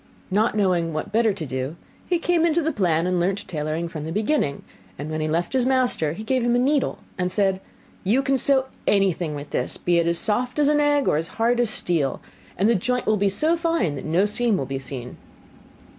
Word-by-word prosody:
Not 215 Hz, +4 st, +2 dB
knowing 175 Hz, -5 st, +1 dB
what 155 Hz, +6 st, -4 dB
better 225 Hz, 0 st, +3 dB
to 185 Hz, -5 st, -5 dB
do, 130 Hz, +3 st, -4 dB, 0.3 s
he 355 Hz, -, +2 dB
came 340 Hz, 0 st, +1 dB
into 335 Hz, 0 st, +2 dB
the 320 Hz, -, 0 dB
plan, 175 Hz, -, +1 dB
and 180 Hz, -1 st, 0 dB
learnt 190 Hz, +3 st, -1 dB
tailoring 155 Hz, +1 st, -3 dB
from 155 Hz, -2 st, -7 dB
the 160 Hz, -, -5 dB
beginning; 210 Hz, -, -1 dB, 0.3 s
and 150 Hz, +2 st, -6 dB
when 155 Hz, 0 st, -2 dB
he 155 Hz, -, -1 dB
left 170 Hz, +7 st, -1 dB
his 260 Hz, -2 st, +2 dB
master, 250 Hz, -, +2 dB
he 215 Hz, -, -7 dB
gave 255 Hz, +3 st, 0 dB
him 240 Hz, 0 st, +2 dB
a -, -, +3 dB
needle, 270 Hz, +3 st, +1 dB, 0.2 s
and 180 Hz, 0 st, 0 dB
said, 195 Hz, -1 st, +1 dB, 0.4 s
'You 235 Hz, +8 st, +2 dB
can 270 Hz, 0 st, +1 dB
sew 265 Hz, +1 st, +3 dB, 0.2 s
anything 185 Hz, -6 st, +1 dB
with 145 Hz, 0 st, -8 dB
this, -, -, -1 dB
be 175 Hz, -1 st, +1 dB
it 170 Hz, -, +1 dB
as 170 Hz, 0 st, +2 dB
soft 245 Hz, -, +1 dB
as 295 Hz, -1 st, +3 dB
an 295 Hz, 0 st, +3 dB
egg 290 Hz, -1 st, +2 dB
or -, -, +3 dB
as 165 Hz, +1 st, -2 dB
hard 235 Hz, +2 st, +2 dB
as 240 Hz, -2 st, +2 dB
steel; 165 Hz, -9 st, +1 dB, 0.4 s
and 195 Hz, -, +2 dB
the 235 Hz, -, +4 dB
joint 250 Hz, +5 st, -1 dB
will 215 Hz, -, +3 dB
be 200 Hz, 0 st, +2 dB
so 310 Hz, -, +2 dB
fine 330 Hz, -, 0 dB
that 140 Hz, -, -6 dB
no 170 Hz, +6 st, +2 dB
seam 215 Hz, 0 st, +1 dB
will 135 Hz, -, -2 dB
be 135 Hz, 0 st, -4 dB
seen. 125 Hz, -2 st, -8 dB
200 Hz, 230 wpm, -23 LUFS, 165-250 Hz, 0.4 s, the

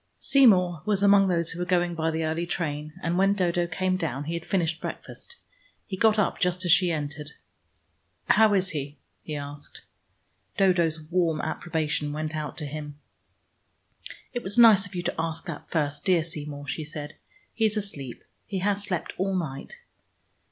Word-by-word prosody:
Seymour 185 Hz, -, +4 dB
was 205 Hz, -2 st, +1 dB
among 200 Hz, -1 st, +6 dB
those 170 Hz, -3 st, +2 dB
who 170 Hz, -, -7 dB
were 180 Hz, -, -1 dB
going 175 Hz, -1 st, +1 dB
by 160 Hz, -1 st, -1 dB
the 160 Hz, 0 st, -1 dB
early 160 Hz, +2 st, -2 dB
train, 155 Hz, -4 st, -3 dB
and 175 Hz, +2 st, 0 dB
when 195 Hz, +1 st, +4 dB
Dodo 175 Hz, -2 st, +1 dB
came 185 Hz, +2 st, 0 dB
down 135 Hz, -6 st, -3 dB
he 160 Hz, +3 st, -4 dB
had 170 Hz, 0 st, -5 dB
finished 170 Hz, -4 st, 0 dB
breakfast. -, -, -8 dB, 0.5 s
He 195 Hz, -, -5 dB
got 220 Hz, +2 st, +3 dB
up 210 Hz, -, +1 dB
just 180 Hz, +1 st, 0 dB
as 175 Hz, -, +3 dB
she 180 Hz, 0 st, +5 dB
entered. 150 Hz, -1 st, -4 dB, 0.9 s
"How 220 Hz, -2 st, +5 dB
is 190 Hz, -1 st, +2 dB
he?" 145 Hz, -2 st, -5 dB, 0.2 s
he 155 Hz, -, -6 dB
asked. 145 Hz, 0 st, -8 dB, 0.8 s
Dodo's 175 Hz, -5 st, +3 dB
warm 165 Hz, 0 st, 0 dB
approbation 155 Hz, -2 st, -2 dB
went 155 Hz, +1 st, -3 dB
out 150 Hz, -2 st, -4 dB
to 150 Hz, -, -4 dB
him. 145 Hz, 0 st, -7 dB, 1.4 s
"It 245 Hz, -, -2 dB
was 205 Hz, 0 st, -6 dB
nice 215 Hz, -4 st, +7 dB
of 195 Hz, -, -12 dB
you 175 Hz, -, -2 dB
to -, -, -2 dB
ask 165 Hz, +1 st, -3 dB
that 170 Hz, -5 st, -7 dB
first, 145 Hz, -3 st, -1 dB
dear 175 Hz, -3 st, +3 dB
Seymour," 145 Hz, -3 st, -7 dB
she 155 Hz, -, -3 dB
said. 150 Hz, 0 st, -7 dB, 0.4 s
"He 225 Hz, -, +1 dB
is 215 Hz, 0 st, +1 dB
asleep: 145 Hz, -, -5 dB, 0.2 s
he 200 Hz, -, -3 dB
has 200 Hz, +2 st, 0 dB
slept 180 Hz, -4 st, -2 dB
all 190 Hz, 0 st, 0 dB
night." 155 Hz, -, -4 dB
170 Hz, 175 wpm, -26 LUFS, 155-190 Hz, 1.4 s, nice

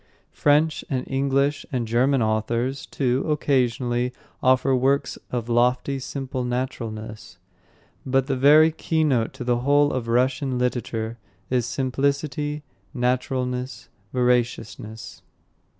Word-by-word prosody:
French 150 Hz, +2 st, +2 dB
and 130 Hz, -2 st, -1 dB
English 140 Hz, +1 st, +1 dB
and 125 Hz, -4 st, -1 dB
German 125 Hz, +3 st, +2 dB
authors, 115 Hz, +5 st, -1 dB
too, 130 Hz, -1 st, 0 dB
occasionally, 125 Hz, -4 st, +1 dB, 0.3 s
offer 130 Hz, +1 st, +3 dB
works 135 Hz, +2 st, +1 dB
of 120 Hz, -2 st, -3 dB
lofty, 125 Hz, +3 st, +1 dB
simple 130 Hz, -1 st, -4 dB
naturalness; 115 Hz, -5 st, -5 dB, 0.7 s
but 135 Hz, 0 st, +1 dB
the 135 Hz, -1 st, -1 dB
very 150 Hz, +5 st, +6 dB
keynote 155 Hz, -8 st, 0 dB
to -, -, -7 dB
the 120 Hz, -1 st, +1 dB
whole 145 Hz, +3 st, +3 dB
of 125 Hz, -3 st, -3 dB
Russian 130 Hz, +2 st, +1 dB
literature 115 Hz, -2 st, -2 dB, 0.3 s
is 125 Hz, -2 st, +1 dB
simplicity, 140 Hz, +3 st, -1 dB, 0.3 s
naturalness, 125 Hz, 0 st, -2 dB, 0.2 s
veraciousness. 120 Hz, -3 st, -1 dB
130 Hz, 105 wpm, -24 LUFS, 120-140 Hz, 0.7 s, very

